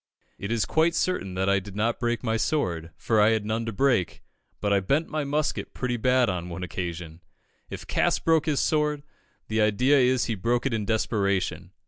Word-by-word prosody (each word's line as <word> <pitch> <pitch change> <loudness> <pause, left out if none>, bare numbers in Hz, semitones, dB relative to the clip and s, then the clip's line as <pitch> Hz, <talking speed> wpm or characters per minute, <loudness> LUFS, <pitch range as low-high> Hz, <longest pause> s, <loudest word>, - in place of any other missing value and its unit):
It 100 +3 -4
is 115 -2 +1
quite 165 +2 +2
certain 100 - -1
that 95 +1 0
I 100 0 +3
did 100 0 -11
not 115 +3 0
break 120 0 -1
my 115 -2 0
sword, 90 - -1
for 110 -2 +2
I 105 - +5
had 110 -2 -1
none 115 +2 -2
to - - -1
break; 115 -5 0 0.4
but 105 -1 0
I 100 - +4
bent 140 - 0
my 155 -1 -2
musket 150 +2 -2
pretty 125 -1 -2
badly 125 -2 +2
on 85 +1 -6
one 90 +2 -6
occasion. 85 -1 -5 0.5
If - - -7
Cass - - +1
broke 160 -1 +2
his 150 -3 +1
sword, 150 -2 0 0.4
the 110 0 0
idea 125 +7 +3
is 125 -1 +3
he 115 - -1
broke 120 +5 -1
it 135 - 0
in 110 -2 -1
desperation. 100 -4 0
115 Hz, 200 wpm, -26 LUFS, 100-135 Hz, 0.5 s, I